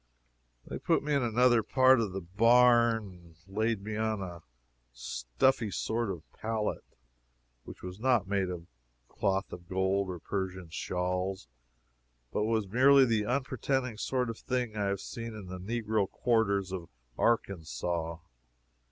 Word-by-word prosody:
They - - -6
put - - +1
me 150 0 -1
in 140 - +3
another 120 0 +4
part 130 +2 +5
of 105 -4 -2
the 95 +1 -4
barn 115 +4 +4
and 90 -4 -14
laid 110 +1 -1
me 110 +1 -4
on 110 -1 0
a 90 -3 -6 0.5
stuffy - - 0
sort 110 +3 -1
of 85 -5 -5
pallet, 110 -1 -2 0.8
which - - -11
was 90 +2 -7
not 120 -5 +2
made 100 -2 0
of 85 -2 -6 0.4
cloth 95 +1 -1
of 90 0 -10
gold, 95 +1 +1
or 90 - -4
Persian 95 -1 -4
shawls, 90 -1 -2 0.8
but 105 - 0
was 110 -2 0
merely 135 +6 +6
the 110 -3 +1
unpretending 130 -2 -1
sort 125 -2 0
of 115 - -10
thing 125 -4 -2
I 105 -1 0
have 100 -1 -1
seen 115 -1 -6
in 105 -3 -8
the 90 0 -7
negro 110 0 -1
quarters 100 -5 +1
of 90 -3 -5 0.3
Arkansas. 85 - -1
105 Hz, 145 wpm, -30 LUFS, 95-115 Hz, 0.8 s, merely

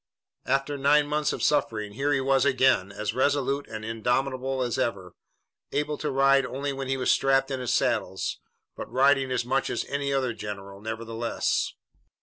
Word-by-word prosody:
After 135 +2 0
nine 145 +2 +4
months 150 0 0
of - - -4
suffering, 110 -8 0
here 140 +6 0
he 135 -2 +2
was 135 0 +3
again, 130 -8 +3
as 105 +1 -3
resolute 140 +1 +1
and 110 0 -7
indomitable 130 +3 -1
as 120 -2 -2
ever, 95 -6 -2 0.6
able 150 0 -1
to 150 - -2
ride 135 0 +4
only 140 +2 -3
when 135 0 -5
he 135 0 0
was 130 - +2
strapped 135 0 +2
in 135 - -2
his 125 -2 -2
saddle, - - 0 0.6
but - - -8
riding 135 0 +3
as 125 -2 0
much 135 +2 0
as - - -2
any 140 0 -2
other 130 -3 0
general, 100 -2 -7
nevertheless. 115 +1 -2
135 Hz, 170 wpm, -26 LUFS, 115-140 Hz, 0.6 s, nine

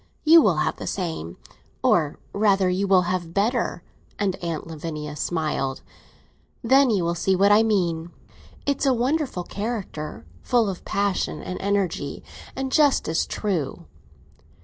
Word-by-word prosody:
You 325 +1 +8
will - - +3
have - - 0
the - - -6
same—or 160 - -2 0.2
rather, 200 -2 +3
you 195 +2 0
will 190 -2 +5
have 175 -1 -3
better!" 215 -3 0 0.3
and 195 -3 0
Aunt 170 -3 -4
Lavinia 155 -2 -6
smiled. 150 -5 -2 0.8
"Then 265 +3 +5
you 200 -6 +1
will 170 0 0
see 190 +2 +1
what 200 +2 +4
I 210 +1 +7
mean. 175 -7 0 0.6
It's 280 0 0
a 260 - +4
wonderful 255 - -1
character, 190 - -5 0.2
full 235 -4 +2
of 180 - -9
passion 200 -6 -1
and 185 - -5
energy, 190 -8 -1 0.3
and 265 0 -3
just 290 -2 +3
as 160 +1 0
true!" 180 -10 -3
190 Hz, 140 wpm, -24 LUFS, 165-220 Hz, 0.8 s, You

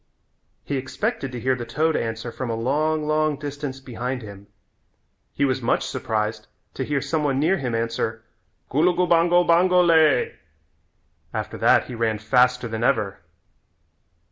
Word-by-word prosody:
He 140 - -2
expected 135 - -3
to 125 - -5
hear 130 +3 +1
the 125 -2 -4
toad 155 +6 0
answer 115 +1 -3
from 130 +1 -5
a 115 - -1
long, 150 +6 0
long 155 -1 +1
distance 145 -2 -5
behind 125 -1 -5
him. 100 -1 -11 0.8
He 140 - 0
was 130 -1 0
much 120 - +1
surprised 110 0 -3 0.3
to - - -3
hear 145 -2 -1
some 155 +2 -1
one 135 -2 +1
near 170 +6 +2
him 125 -4 -2
answer, 115 -1 -2 0.5
"Gulugubango, 175 +2 +3
bango 180 +2 +4
lay." 160 -5 +3 1.0
After - - -4
that - - +4
he 125 - -9
ran 115 -2 0
faster 125 +2 +2
than 110 0 -4
ever. 110 -7 +1
135 Hz, 145 wpm, -23 LUFS, 115-155 Hz, 1.0 s, bango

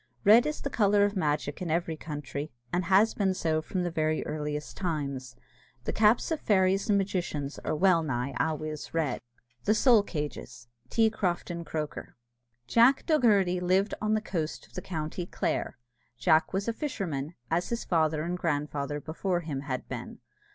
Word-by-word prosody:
Red 225 +6 +7
is 300 - -3
the 280 - -3
colour 205 -3 +4
of 205 +1 -2
magic 150 -3 -1
in 180 - -3
every 165 0 0
country, 150 -1 -5 0.2
and 180 0 +1
has 195 +5 +4
been 190 -2 +1
so 160 -3 0
from 180 +3 -2
the 175 - -2
very 155 -1 0
earliest 150 -1 -4
times. 140 -8 -3 0.5
The - - -3
caps 220 +7 +3
of 320 - 0
fairies 195 -1 +2
and 205 - +5
magicians 175 -7 -2
are 155 - -2
well 180 0 +4
nigh 135 -3 -2
always 155 0 -2
red. 160 -4 0 0.4
THE 215 - +4
SOUL 235 -1 +6
CAGES. 145 - -6 0.2
T. 225 -1 +3
CROFTON 175 -4 -2
CROKER. 155 -2 -5 0.5
Jack 235 - +4
Dogherty 205 - +3
lived 185 +3 +2
on 215 0 +2
the 215 - 0
coast 165 -7 -3
of - - -24
the 185 - -5
county 165 0 -4
Clare. - - -2 0.4
Jack 155 +5 +3
was 195 +2 -2
a 230 - +1
fisherman, 175 - -3 0.2
as 170 +2 +1
his 235 0 -2
father 155 -3 +1
and 175 +2 -3
grandfather 145 -2 -1
before 175 +4 -2
him 150 -5 -4
had 130 -3 -4
been. - - -6
170 Hz, 170 wpm, -29 LUFS, 150-200 Hz, 0.5 s, Red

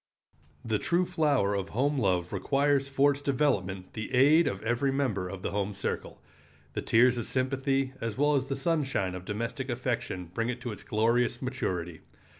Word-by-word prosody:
The 110 -2 0
true 175 +1 +1
flower 150 - +1
of 100 -1 -2
home 140 +5 +1
love 90 -5 0
requires 140 0 +1
for 140 +1 +4
its 140 0 -5
development 105 -10 0
the 110 -1 -5
aid 145 +5 +6
of 100 +1 -3
every 120 +4 +1
member 115 -10 -1
of 95 0 -7
the - - -2
home 100 0 -2
circle. 100 - -4 0.5
The - - -2
tears 120 +2 +4
of 115 - -4
sympathy 135 +1 0
as 115 -1 -3
well 145 +2 +3
as 135 -1 0
the 135 - -2
sunshine 135 - 0
of 90 0 -7
domestic 115 +6 -4
affection 120 -8 -3
bring 115 +4 -1
it 125 0 -3
to 120 - -4
its 105 - -8
glorious 115 +3 +1
maturity. 90 - -3
125 Hz, 180 wpm, -29 LUFS, 100-140 Hz, 0.5 s, aid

